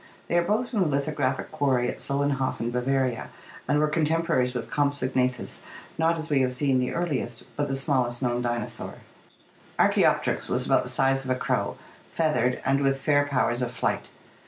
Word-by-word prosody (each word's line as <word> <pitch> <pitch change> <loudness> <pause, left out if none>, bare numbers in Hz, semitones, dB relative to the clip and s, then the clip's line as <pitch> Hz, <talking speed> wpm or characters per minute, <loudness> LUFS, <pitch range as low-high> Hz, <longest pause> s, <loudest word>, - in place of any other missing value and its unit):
They 170 - +2
are - - +1
both 220 +7 0
from 225 - -1
the 185 - +3
lithographic 140 -2 -1
quarry 135 -5 +1
at - - -4
Solenhofen, 140 -4 -1
Bavaria, 130 0 0 0.4
and - - +2
were 150 +1 +3
contemporaries 155 -4 +1
with 120 - -4
Compsognathus, 130 -3 0 0.3
not, 165 +1 +2
as 160 -1 -4
we 145 -4 +2
have 130 -1 +1
seen, 130 0 +2
the 125 - -1
earliest, 140 -9 -2
but 145 0 0
the 135 - -1
smallest 130 -3 +1
known 120 -2 0
dinosaur. 120 -2 -3 0.8
Archaopteryx - - +2
was - - +1
about - - +4
the - - -7
size 135 0 +2
of 130 - -6
a 130 - +2
crow, - - -1 0.4
feathered, 140 -6 +1
and 135 +1 +2
with 135 -1 +2
fair 145 0 +3
powers 125 -3 +1
of 125 -1 -1
flight. 115 - -1
135 Hz, 175 wpm, -26 LUFS, 125-150 Hz, 0.8 s, about